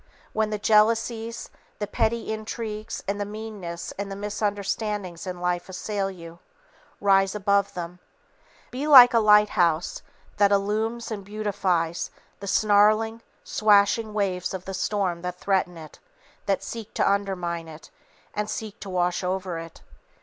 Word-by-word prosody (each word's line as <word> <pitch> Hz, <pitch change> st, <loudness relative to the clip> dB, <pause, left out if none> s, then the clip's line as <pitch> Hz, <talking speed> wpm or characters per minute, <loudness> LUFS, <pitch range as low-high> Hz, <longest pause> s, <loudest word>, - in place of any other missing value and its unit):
When 220 Hz, 0 st, +1 dB
the 210 Hz, -, -2 dB
jealousies, 225 Hz, +2 st, +1 dB, 0.3 s
the 210 Hz, -, -2 dB
petty 220 Hz, +2 st, -1 dB
intrigues 215 Hz, 0 st, -5 dB
and 200 Hz, +1 st, -2 dB
the -, -, +2 dB
meannesses 205 Hz, -5 st, -6 dB
and 200 Hz, 0 st, -4 dB
the -, -, -4 dB
misunderstandings 205 Hz, -2 st, -3 dB
in 180 Hz, -1 st, -5 dB
life 180 Hz, 0 st, -1 dB
assail 195 Hz, +1 st, -2 dB
you, 170 Hz, -2 st, -11 dB, 0.6 s
rise 195 Hz, 0 st, +3 dB
above 200 Hz, -1 st, +1 dB
them. 175 Hz, 0 st, -6 dB, 0.7 s
Be 270 Hz, +4 st, -3 dB
like 255 Hz, -5 st, +10 dB
a 230 Hz, -, +5 dB
lighthouse 210 Hz, -6 st, +3 dB, 0.4 s
that 205 Hz, -1 st, +4 dB
illumines 220 Hz, +4 st, 0 dB
and 205 Hz, -3 st, -4 dB
beautifies 190 Hz, -5 st, -1 dB, 0.3 s
the 200 Hz, -, -7 dB
snarling, 215 Hz, +2 st, +3 dB, 0.2 s
swashing 215 Hz, +1 st, +3 dB
waves 190 Hz, -3 st, -1 dB
of 185 Hz, -, -7 dB
the 195 Hz, -, -5 dB
storm 190 Hz, -3 st, -1 dB
that 180 Hz, 0 st, -4 dB
threaten 185 Hz, -3 st, 0 dB
it, 155 Hz, -1 st, -12 dB, 0.5 s
that 195 Hz, -1 st, +1 dB
seek 225 Hz, -3 st, -7 dB
to -, -, +2 dB
undermine 180 Hz, -4 st, -1 dB
it 160 Hz, 0 st, -12 dB, 0.4 s
and 210 Hz, 0 st, -2 dB
seek 215 Hz, -1 st, -5 dB
to 200 Hz, -, -8 dB
wash 180 Hz, 0 st, 0 dB
over 185 Hz, -2 st, -2 dB
it. 165 Hz, -1 st, -11 dB
200 Hz, 140 wpm, -25 LUFS, 180-215 Hz, 0.7 s, like